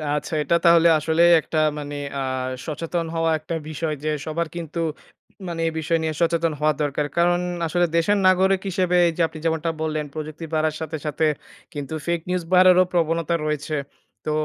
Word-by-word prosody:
আচ্ছা। 150 - -4
এটা 170 - +2
তাহলে 170 0 +6
আসলেই 165 +3 +4
একটা 155 - -4 0.2
মানে 145 0 -6 0.2
আ - - -2 0.4
সচেতন 165 +2 -3
হওয়া 165 0 +1
একটা 155 +2 -5
বিষয় 155 0 -2
যে 155 - -1 0.2
সবার 165 +2 -2
কিন্তু 170 -1 -5 0.7
মানে 170 -1 -4
এই - - 0
বিষয় 165 +1 +1
নিয়ে 160 -1 -1
সচেতন 165 -1 +1
হওয়া 155 0 +3
দরকার। 145 0 0
কারণ 175 +1 +3 0.3
আসলে 175 +2 +2
দেশের 205 +5 +3
নাগরিক 190 +1 +3
হিসেবে 180 0 0
এই 170 - +1
যে - - 0
আপনি 160 - -10
যেমনটা 165 0 0
বললেন 155 -1 -1
প্রযুক্তি 155 +1 -6
বাড়ার 155 0 +1
সাথে, 160 0 -4
সাথে 150 +1 0 0.5
কিন্তু 145 0 -5
ফেইক 170 -1 0
নিউজ 180 -1 0
বাড়ারও 185 0 +7
প্রবণতা 165 0 +1
রয়েছে। 150 0 -2 0.5
তো 155 - -1
165 Hz, 175 wpm, -23 LUFS, 155-170 Hz, 0.7 s, বাড়ারও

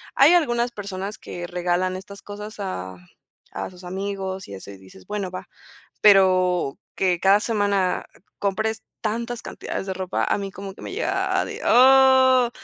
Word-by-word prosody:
Hay 285 +5 +7
algunas 240 -8 +2
personas 200 -1 -6
que 175 0 -7
regalan 180 +1 -1
estas 200 +1 -11
cosas 210 +1 -8
a 95 - -5 0.6
a - - -4
sus 180 0 -15
amigos 190 +1 -4
y 100 - -8
eso. 95 +1 -10
Y 100 - -11
dices: 95 0 -16
"Bueno, 205 -3 -3
va". 185 0 -8 0.6
Pero 185 -6 +4 0.2
que 180 -2 +1
cada 195 +3 +4
semana 205 -4 0 0.3
compres 220 +3 -1 0.2
tantas 235 +2 -3
cantidades - - -6
de 190 - -3
ropa, 185 0 -2
a - - +1
mí 200 -1 -4
como 195 0 -8
que - - -14
me - - -6
llega 435 +6 0
a - - 0
de, - - -7
ah 260 -1 +6
195 Hz, 165 wpm, -23 LUFS, 185-220 Hz, 0.6 s, Hay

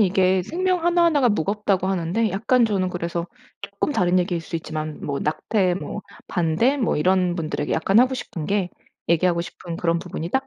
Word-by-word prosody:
이게 185 -2 +3
생명 360 - -1
하나하나가 340 -6 +4
무겁다고 200 -1 0
하는데 190 +4 0
약간 230 +6 +2
저는 195 -4 0
그래서 170 -1 -3 0.3
쪼끔 200 +8 -3
다른 180 -5 +2
얘기일 175 -1 0
수 165 +1 -5
있지만 155 -1 -5
뭐 140 -1 -2
낙태 180 +4 0
뭐 195 +2 -5 0.3
반대 180 - +1
뭐 240 -5 0
이런 180 +2 +2
분들에게 155 -3 -3
약간 195 +6 +3
하고 255 +2 +4
싶은 170 -10 -6
게 200 -3 0 0.4
얘기하고 170 +1 +2
싶은 170 0 -7
그런 170 0 +1
부분이 170 -1 -6
딱 265 +4 0
185 Hz, 380 characters per minute, -23 LUFS, 170-220 Hz, 0.4 s, 하나하나가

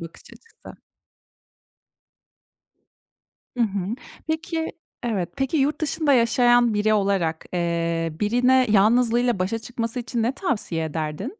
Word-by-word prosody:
bakış 165 0 -10
açısı. 455 - -15 2.8
Hı 240 - +2
hı. 200 0 -3 0.3
Peki 320 +1 -3 0.3
Evet, 195 -7 -1
peki 270 +3 -1
yurt 290 +2 +1
dışında 310 -1 +1
yaşayan 240 -1 +4
biri 210 +1 +2
olarak, 195 -6 0
eee, 170 -1 -1
birine 250 +4 +3
yalnızlığıyla 235 +2 +3
başa 190 +5 -1
çıkması 230 +1 -4
için 240 -1 -3
ne 235 +3 +1
tavsiye 210 - -2
ederdin? 155 - -4
230 Hz, 110 wpm, -23 LUFS, 185-250 Hz, 2.8 s, yaşayan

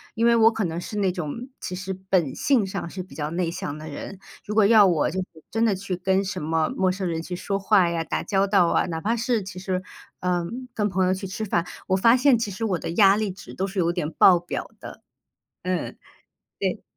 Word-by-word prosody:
因 230 - +1
为 235 - +6
我 225 0 +6
可 225 -1 -2
能 170 -2 -2
是 210 - -6
那 195 -2 +2
种， 180 - -5
其 180 - -5
实 185 +1 -4 0.2
本 170 -8 +2
性 255 -7 +2
上 190 -2 -5
是 185 +1 -6
比 185 - -16
较 150 0 -3
内 170 0 -1
向 170 -5 -5
的 155 +1 -9
人， 155 +6 -7 0.3
如 210 - -4
果 215 -2 +5
要 210 -1 +7
我 170 -5 +1
就 190 - -3
是 165 -4 -8
真 225 +1 +2
的 215 -4 +2
去 190 0 -4
跟 190 +1 +1
什 190 -1 -4
么 160 +1 0
陌 190 -1 +1
生 190 0 -3
人 165 -1 -2
去 175 +2 -5
说 195 +2 -2
话 190 -2 +4
呀， 170 -1 -1
打 - - -2
交 195 -1 +1
道 195 -3 +4
啊， - - +2
哪 165 -2 -4
怕 220 +5 0
是 235 -2 0
其 190 -1 -8
实， 185 0 -2 0.4
呃， 180 -1 0 0.3
跟 210 -3 0
朋 190 -1 +1
友 185 - +2
去 190 +1 -5
吃 190 +4 -5
饭， 175 -5 0 0.2
我 190 - +2
发 230 +5 +5
现 255 -2 +4
其 225 - -2
实 200 +3 -6
我 190 -6 0
的 - - -4
压 195 +2 +5
力 215 -1 -1
值 190 +1 -10
都 190 - -2
是 195 +1 -8
有 170 -1 +2
点 175 -4 -2
爆 180 -2 +6
表 175 - -5
的， - - -10 0.6
嗯， 180 -1 -2 0.6
对。 - - -1
190 Hz, 260 characters per minute, -24 LUFS, 175-205 Hz, 0.6 s, 要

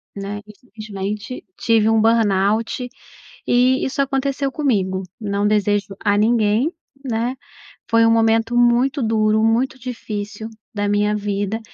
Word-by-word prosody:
né, 200 +1 -5
e 210 - -13
simplesmente 210 -1 -6 0.2
tive 225 -2 +3
um 225 -1 +3
Burnout, 225 +2 +1 0.6
e 255 +2 +3
isso 270 +1 -1
aconteceu 275 0 -1
comigo, 195 -11 0 0.2
não 200 0 0
desejo 205 -1 0
a 205 -1 +2
ninguém, 225 +5 +2 0.3
né, 240 +2 -1 0.5
foi 230 0 +4
um 225 - +4
momento 225 +1 +2
muito 245 +4 +3
duro, 220 0 +2
muito 245 +4 +1
difícil 220 -3 -6 0.2
da 205 -1 -1
minha 210 +1 +1
vida, 205 +1 -2
220 Hz, 130 wpm, -20 LUFS, 205-240 Hz, 0.6 s, foi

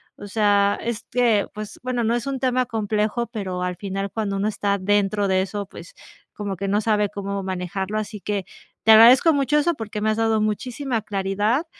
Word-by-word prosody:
O 205 - -10
sea, 205 -1 +2
este, 235 -1 0
pues 210 -1 -7
bueno, 250 -1 -2
no 225 +1 +1
es 240 +1 -2
un 270 -1 -2
tema 255 -1 +1
complejo, 215 +1 -1
pero 190 -6 -4
al 180 0 -2
final, 195 0 -4
cuando 210 -3 -2
uno 200 +2 0
está 200 -1 0
dentro 205 +1 +1
de 190 -1 +2
eso, 200 +1 -4
pues, - - -13 0.4
como 205 -2 -4
que 195 +2 -4
no 205 +2 +1
sabe 210 -2 +1
cómo 200 -1 -4
manejarlo. 190 +2 -3
Así 210 -1 -5
que, 200 -3 -3 0.4
te 220 - +6
agradezco 240 +8 +8
mucho 285 +1 +2
eso, 340 +3 +2
porque 215 -2 -6
me 215 - +1
has 215 - -2
dado 225 -1 +2
muchísima 235 +3 -2
claridad, 205 - -1
210 Hz, 195 wpm, -23 LUFS, 200-230 Hz, 0.4 s, agradezco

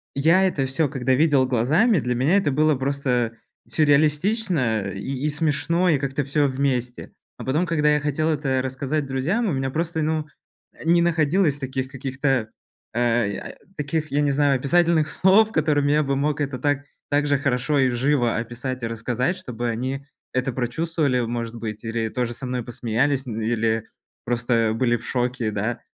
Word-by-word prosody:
я 165 +7 +4
это 140 -7 -1
всё, 140 +3 +1
когда 130 -2 0
видел 145 -3 +3
глазами, 155 - +3
для 125 -2 -1
меня 140 +9 +2
это 155 -8 +1
было 155 +2 +3
просто 130 -4 -1 0.3
сюрреалистично 150 - +2
и 95 - -7 0.3
и - - +1
смешно, 160 +4 +1
и 150 - +4
как-то 140 +1 -2
всё 145 +1 +2
вместе. 130 -2 -2 0.2
А - - -8
потом, 150 +7 +1
когда 150 -3 +2
я 150 - +2
хотел 150 +2 0
это 140 -4 0
рассказать 135 +3 -2
друзьям, 160 - 0
у 175 - 0
меня 135 0 -1
просто, 165 +1 -2
ну, 155 0 -1 0.6
не 170 +1 +4
находилось 160 -1 +2
таких 130 -1 -3
каких-то, 135 -3 -1 0.4
э, 120 -3 +1
я, - - -7
э, - - -17 0.2
таких, 150 +1 -2
я 145 - +1
не 145 -1 +2
знаю, 140 -1 +3
описательных 160 +3 +2
слов, 210 +6 +4
которыми 145 -2 +2
я 150 - +3
бы 140 -1 0
мог 150 +1 0
это 140 -3 -2
так 145 -1 0 0.3
так 145 0 +2
же 145 -1 +2
хорошо 140 +1 0
и 130 - +4
живо 125 -1 +1
описать 125 +2 -5
и 115 - 0
рассказать, 120 - -2
чтобы 120 -1 -4
они 130 +4 -3 0.3
это 130 +1 0
прочувствовали, 135 +2 0
может 115 0 -3
быть, 110 -1 -6
или 115 0 -2
тоже 120 -1 -2
со 130 +2 -7
мной 125 -1 -3
посмеялись, 125 +4 -1
или 115 -1 -1 0.4
просто 115 -2 +1
были 120 0 +2
в 115 - -12
шоке, 125 -3 -1
да. 110 +4 -2
135 Hz, 175 wpm, -23 LUFS, 120-150 Hz, 0.6 s, я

